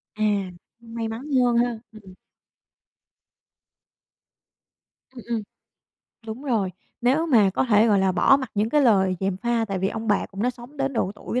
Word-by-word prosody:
À, 215 Hz, -, -2 dB, 0.6 s
may 230 Hz, -1 st, -6 dB
mắn 225 Hz, +2 st, -6 dB, 0.2 s
hơn 240 Hz, -1 st, +2 dB
ha! 240 Hz, -2 st, 0 dB
Ừm. 200 Hz, -4 st, -14 dB, 3.0 s
Ừm, 240 Hz, -, -10 dB
ừm, 230 Hz, -2 st, -1 dB, 0.9 s
đúng 225 Hz, +5 st, -7 dB
rồi. 220 Hz, -9 st, 0 dB, 0.3 s
Nếu 270 Hz, +7 st, +2 dB
mà 220 Hz, -10 st, +4 dB
có 195 Hz, -, 0 dB
thể 220 Hz, -2 st, +4 dB
gọi 205 Hz, -2 st, +4 dB
là 190 Hz, -1 st, +2 dB
bỏ 235 Hz, +9 st, +5 dB
mặc 260 Hz, -4 st, -6 dB
những 210 Hz, +2 st, +1 dB
cái 295 Hz, -, +3 dB
lời 190 Hz, -6 st, +3 dB
gièm 190 Hz, -1 st, -1 dB
pha, 235 Hz, +2 st, 0 dB
tại 195 Hz, -3 st, -3 dB
vì 190 Hz, -, 0 dB
ông 225 Hz, +1 st, -5 dB
bà 205 Hz, -, +1 dB
cũng 195 Hz, +2 st, -6 dB
đã 250 Hz, -, +2 dB
sống 245 Hz, +4 st, -14 dB
đến 275 Hz, 0 st, -1 dB
độ 200 Hz, -4 st, -1 dB
tuổi 240 Hz, +3 st, -3 dB
225 Hz, 175 wpm, -24 LUFS, 200-245 Hz, 3.0 s, bỏ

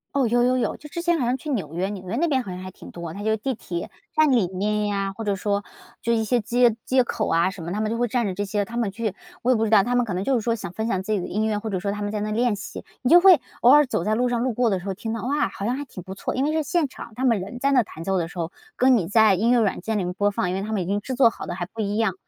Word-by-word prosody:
哦， 275 Hz, -2 st, +3 dB
有 240 Hz, +2 st, +2 dB
有 255 Hz, +1 st, +3 dB
有， 250 Hz, -, -1 dB
就 300 Hz, -, -12 dB
之 340 Hz, +3 st, -4 dB
前 345 Hz, -1 st, +1 dB
好 250 Hz, -, +1 dB
像 245 Hz, +2 st, +1 dB
去 305 Hz, -, -8 dB
纽 190 Hz, -, -2 dB
约， 185 Hz, +3 st, -1 dB
纽 190 Hz, -3 st, -7 dB
约 215 Hz, -, -2 dB
那 335 Hz, +7 st, +1 dB
边 270 Hz, -4 st, +1 dB
好 200 Hz, -, -7 dB
像 180 Hz, -, -6 dB
还 185 Hz, 0 st, -7 dB
挺 -, -, -13 dB
多， 170 Hz, -2 st, -7 dB
它 200 Hz, -, -7 dB
有 220 Hz, +1 st, +1 dB
地 265 Hz, +5 st, -2 dB
铁 175 Hz, -6 st, -6 dB, 0.2 s
站 310 Hz, -2 st, +4 dB
里 230 Hz, -8 st, +3 dB
面 210 Hz, +3 st, -1 dB
呀， 195 Hz, -1 st, -1 dB
或 225 Hz, -, -5 dB
者 205 Hz, -2 st, 0 dB
说 200 Hz, +1 st, -1 dB, 0.4 s
就 235 Hz, -, +1 dB
一 225 Hz, -1 st, +1 dB
些 240 Hz, +3 st, +1 dB
街 235 Hz, +1 st, +3 dB
街 255 Hz, 0 st, +3 dB
口 -, -, -2 dB, 0.2 s
什 190 Hz, -2 st, -10 dB
么， 170 Hz, -, -5 dB
他 210 Hz, +3 st, -2 dB
们 215 Hz, 0 st, -1 dB
就 230 Hz, -, -1 dB
会 245 Hz, +1 st, +1 dB
站 240 Hz, +1 st, 0 dB
着 195 Hz, -, -2 dB
这 205 Hz, +2 st, -2 dB
些 205 Hz, +1 st, -1 dB
他 235 Hz, +3 st, -7 dB
们 230 Hz, -4 st, +1 dB
去 220 Hz, 0 st, -3 dB, 0.3 s
我 255 Hz, -, +3 dB
也 -, -, +4 dB
不 225 Hz, -, +1 dB
知 215 Hz, -, -1 dB
道， 210 Hz, -3 st, +6 dB
他 245 Hz, +3 st, 0 dB
们 245 Hz, -1 st, +3 dB
可 205 Hz, -, -4 dB
能 185 Hz, +2 st, -2 dB
就 270 Hz, -, +1 dB
是 235 Hz, -, +1 dB
说， 230 Hz, +1 st, 0 dB
想 195 Hz, -5 st, -6 dB
分 220 Hz, +5 st, -3 dB
享 190 Hz, -4 st, -1 dB
自 215 Hz, -, -4 dB
己 205 Hz, -, +2 dB
的 -, -, -4 dB
音 215 Hz, +2 st, -1 dB
乐， 215 Hz, -1 st, 0 dB
或 220 Hz, 0 st, -5 dB
者 190 Hz, -, -1 dB
说 200 Hz, +2 st, -2 dB
他 205 Hz, +1 st, -5 dB
们 205 Hz, 0 st, -2 dB
在 210 Hz, -, -2 dB
那 215 Hz, +1 st, -2 dB
练 230 Hz, 0 st, +1 dB
习， 200 Hz, -, -8 dB, 0.2 s
你 250 Hz, -, 0 dB
就 350 Hz, -, +10 dB
会 370 Hz, -3 st, +7 dB, 0.2 s
偶 240 Hz, -, +6 dB
尔 295 Hz, +1 st, +7 dB
走 210 Hz, -, -2 dB
在 215 Hz, +4 st, +1 dB
路 245 Hz, +2 st, +1 dB
上， 240 Hz, -1 st, 0 dB
路 250 Hz, 0 st, 0 dB
过 240 Hz, 0 st, +2 dB
的 190 Hz, -, 0 dB
时 180 Hz, -, -12 dB
候 195 Hz, -, -2 dB
听 225 Hz, +3 st, -5 dB
到， 230 Hz, -, -4 dB
哇， 290 Hz, +4 st, 0 dB
好 200 Hz, -, -6 dB
像 240 Hz, +3 st, 0 dB
还 285 Hz, +1 st, -5 dB
挺 185 Hz, -, -10 dB
不 190 Hz, 0 st, -8 dB
错， -, -, -3 dB
因 260 Hz, -, +1 dB
为 305 Hz, -, 0 dB
是 315 Hz, -1 st, +1 dB
现 315 Hz, +2 st, +1 dB
场 245 Hz, -3 st, -10 dB
他 260 Hz, -, -1 dB
们 230 Hz, -5 st, +3 dB
人 200 Hz, +6 st, -7 dB
在 275 Hz, +2 st, +2 dB
那 255 Hz, -3 st, +4 dB
弹 165 Hz, -5 st, -10 dB
奏 195 Hz, +2 st, 0 dB
的 170 Hz, -2 st, -1 dB
时 175 Hz, -, -9 dB
候， 165 Hz, 0 st, -2 dB, 0.2 s
跟 255 Hz, -1 st, +5 dB
你 175 Hz, -, -1 dB
在 215 Hz, 0 st, +5 dB
音 225 Hz, +6 st, +2 dB
乐 245 Hz, -, +5 dB
软 200 Hz, -4 st, 0 dB
件 220 Hz, +2 st, -1 dB
里 -, -, -1 dB
面 180 Hz, -, -3 dB
播 205 Hz, +2 st, +1 dB
放， 180 Hz, -, -1 dB
因 180 Hz, -, -1 dB
为 190 Hz, -, -2 dB
他 215 Hz, +2 st, -5 dB
们 210 Hz, -4 st, 0 dB
已 -, -, -3 dB
经 200 Hz, +3 st, -1 dB
制 260 Hz, +4 st, -4 dB
作 245 Hz, -2 st, +6 dB
好 -, -, -8 dB
的 -, -, -4 dB
还 175 Hz, 0 st, -4 dB
不 220 Hz, +5 st, -6 dB
一 205 Hz, +1 st, -1 dB
样。 220 Hz, -5 st, +1 dB
220 Hz, 385 characters per minute, -24 LUFS, 195-245 Hz, 0.4 s, 就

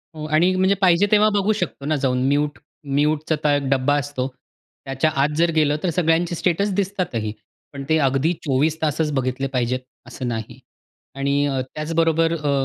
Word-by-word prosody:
हो 155 Hz, -, -6 dB
आणि 165 Hz, +5 st, +3 dB
म्हणजे 190 Hz, +1 st, +3 dB
पाहिजे 185 Hz, +1 st, +4 dB
तेव्हा 215 Hz, 0 st, +5 dB
बघू 205 Hz, +1 st, +2 dB
शकतो 175 Hz, -8 st, -4 dB
ना 155 Hz, +1 st, +1 dB
जाऊन 130 Hz, -2 st, 0 dB
म्यूट 145 Hz, +1 st, 0 dB, 0.4 s
म्यूटचा 150 Hz, 0 st, +1 dB
एक 145 Hz, -, -1 dB
डब्बा 135 Hz, +1 st, +2 dB
असतो. 140 Hz, -2 st, -3 dB, 0.6 s
त्याच्या 135 Hz, +3 st, 0 dB
आत 150 Hz, -, +2 dB
जर 170 Hz, 0 st, +3 dB
गेलं 150 Hz, -1 st, +3 dB
तर 180 Hz, -, +1 dB
सगळ्यांचे 170 Hz, 0 st, +1 dB
स्टेटस 190 Hz, +4 st, 0 dB
दिसतातही. 185 Hz, -, -2 dB, 0.4 s
पण 140 Hz, 0 st, -6 dB
ते 160 Hz, -, +4 dB
अगदी 135 Hz, +6 st, +1 dB
24 150 Hz, +2 st, 0 dB
बघितले 130 Hz, 0 st, -1 dB
पाहिजेत 125 Hz, -1 st, -1 dB, 0.3 s
असं 125 Hz, +1 st, -6 dB
नाही. 110 Hz, -3 st, -5 dB, 0.6 s
आणि 140 Hz, +1 st, +1 dB
अ 135 Hz, -2 st, -1 dB, 0.2 s
त्याचबरोबर 165 Hz, +1 st, +1 dB
अ 150 Hz, -3 st, -1 dB
150 Hz, 160 wpm, -21 LUFS, 135-165 Hz, 0.6 s, तेव्हा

